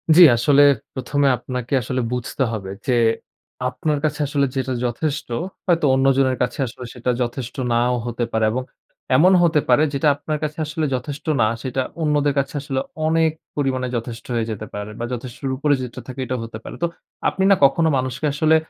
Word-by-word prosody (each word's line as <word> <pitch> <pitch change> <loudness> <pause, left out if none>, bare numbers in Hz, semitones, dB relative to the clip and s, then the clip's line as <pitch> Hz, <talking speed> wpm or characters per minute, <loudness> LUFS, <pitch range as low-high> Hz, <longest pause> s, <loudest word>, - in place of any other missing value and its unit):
জি। 180 - +8 0.2
আসলে 140 +4 +4 0.3
প্রথমে 140 +2 0
আপনাকে 125 +1 -5
আসলে 130 +2 -2
বুঝতে 125 +2 -2
হবে 100 -3 -5 0.2
যে, 125 - +3 0.8
আপনার 145 +4 -1
কাছে 150 0 -1
আসলে 140 0 +1
যেটা 130 -1 -1
যথেষ্ট, 140 +5 -2 0.4
হয়তো 170 -4 +3
অন্যজনের 135 -1 +3
কাছে - - -3
আসলে 125 +1 -9
সেটা 125 0 -1
যথেষ্ট 120 +1 -3 0.2
নাও 120 +1 +2
হতে 120 0 -2
পারে। 110 -1 +2
এবং 130 +3 -2 0.5
এমন 180 +8 +6
হতে 160 -3 +4
পারে 125 +5 +5
যেটা 140 +2 +1
আপনার 150 +1 -3
কাছে 150 +1 -3
আসলে 155 +1 -2
যথেষ্ট 140 +3 -6 0.2
না, 110 - +5 0.2
সেটা 130 0 -1 0.2
অন্যদের 145 -2 +2
কাছে 140 0 -2
আসলে 135 -2 -2 0.3
অনেক 160 0 +3 0.2
পরিমাণে 130 -3 0
যথেষ্ট 115 0 -5
হয়ে 115 -1 0
যেতে 110 0 -5
পারে 105 +1 -5
বা, 120 - -2
যথেষ্টর 130 +2 -5
উপরে 145 +1 +2
যেটা 125 -2 -6
থাকে 130 +1 -8
এটাও 130 0 -2
হতে 115 -1 -8
পারে। - - -8
তো - - +4 0.4
আপনি 190 - -2
না 195 - +8
কখনো 160 +4 +3
মানুষকে 130 +3 -2
আসলে 155 +1 +3
130 Hz, 180 wpm, -21 LUFS, 125-150 Hz, 0.8 s, জি